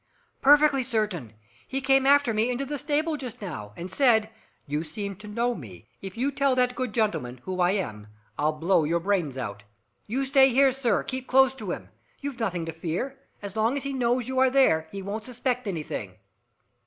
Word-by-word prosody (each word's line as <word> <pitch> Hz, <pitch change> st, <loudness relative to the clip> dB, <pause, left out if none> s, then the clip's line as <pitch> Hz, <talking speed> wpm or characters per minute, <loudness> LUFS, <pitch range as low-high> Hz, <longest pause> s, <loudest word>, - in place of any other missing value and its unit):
"Perfectly 290 Hz, 0 st, +6 dB
certain! 215 Hz, -, -2 dB, 0.4 s
He 270 Hz, -, -2 dB
came 270 Hz, 0 st, +3 dB
after 280 Hz, -4 st, +5 dB
me 220 Hz, +3 st, +1 dB
into 250 Hz, +2 st, -2 dB
the 290 Hz, +1 st, -4 dB
stable 305 Hz, +2 st, 0 dB
just 250 Hz, -3 st, -7 dB
now, 155 Hz, -, -6 dB
and 175 Hz, +2 st, -6 dB
said, 225 Hz, -5 st, +3 dB, 0.3 s
'You 150 Hz, +2 st, -2 dB
seem 200 Hz, +5 st, -5 dB
to 210 Hz, +2 st, -11 dB
know 235 Hz, +3 st, 0 dB
me. 105 Hz, -, -11 dB
If 195 Hz, +1 st, -8 dB
you 270 Hz, +4 st, 0 dB
tell 275 Hz, -1 st, +2 dB
that 250 Hz, 0 st, +2 dB
good 255 Hz, -2 st, -3 dB
gentleman 205 Hz, -, -1 dB
who 185 Hz, +3 st, -4 dB
I 180 Hz, +1 st, +3 dB
am, 105 Hz, -, -3 dB, 0.3 s
I'll 150 Hz, +1 st, +1 dB
blow 165 Hz, +2 st, +2 dB
your 165 Hz, +3 st, +1 dB
brains 170 Hz, -7 st, -1 dB
out!' 105 Hz, -5 st, -5 dB, 0.4 s
You 260 Hz, +6 st, -1 dB
stay 270 Hz, 0 st, +6 dB
here, 270 Hz, +2 st, +5 dB
sir, 250 Hz, -4 st, +1 dB
keep 260 Hz, 0 st, -5 dB
close 265 Hz, 0 st, +5 dB
to 265 Hz, -, -7 dB
him. -, -, -5 dB, 0.3 s
You've 280 Hz, -3 st, -5 dB
nothing 180 Hz, -7 st, -1 dB
to 165 Hz, -, -5 dB
fear. 175 Hz, -, -4 dB, 0.2 s
As 200 Hz, 0 st, -6 dB
long 225 Hz, +5 st, +1 dB
as 280 Hz, -, -3 dB
he 275 Hz, 0 st, -3 dB
knows 245 Hz, -1 st, 0 dB
you 260 Hz, 0 st, -1 dB
are 260 Hz, 0 st, +5 dB
there, 250 Hz, -13 st, +3 dB
he 195 Hz, -1 st, -6 dB
won't 210 Hz, +3 st, -4 dB
suspect 250 Hz, -1 st, -2 dB
anything." 165 Hz, -6 st, -4 dB
230 Hz, 200 wpm, -26 LUFS, 180-265 Hz, 0.4 s, Perfectly